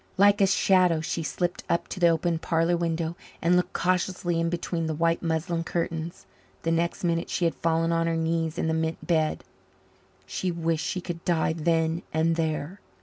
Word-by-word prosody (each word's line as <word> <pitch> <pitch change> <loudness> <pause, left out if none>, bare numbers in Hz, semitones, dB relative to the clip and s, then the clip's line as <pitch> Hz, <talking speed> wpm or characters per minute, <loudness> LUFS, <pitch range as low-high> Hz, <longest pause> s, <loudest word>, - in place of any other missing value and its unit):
Like 200 +1 +5
a 195 - +6
shadow 185 -3 +4
she 165 +1 -2
slipped 175 +4 -2
up 170 - +1
to 190 - -5
the 175 - +5
open 165 0 +1
parlour 165 +1 +1
window 165 -1 -1 0.2
and 170 +2 +3
looked 180 - +1
cautiously 180 -1 0
in 165 0 +1
between 170 -1 -2
the 160 - -2
white 165 +1 +1
muslin 165 0 -1
curtains. 165 0 -3 0.4
The 165 - +1
next 170 +2 0
minute 170 -1 0
she 175 - 0
had 165 - +2
fallen 165 0 +1
on 165 0 +1
her 165 0 0
knees 165 0 -1
in - - 0
the 160 - +1
mint 160 0 -2
bed. 160 -3 +1 0.8
She 185 - -2
wished 165 -2 -1
she 185 - -2
could 170 -2 -6
die 165 -2 +1
then 165 +1 +1
and 160 +1 +2
there. 160 +3 -2
165 Hz, 190 wpm, -26 LUFS, 160-175 Hz, 0.8 s, a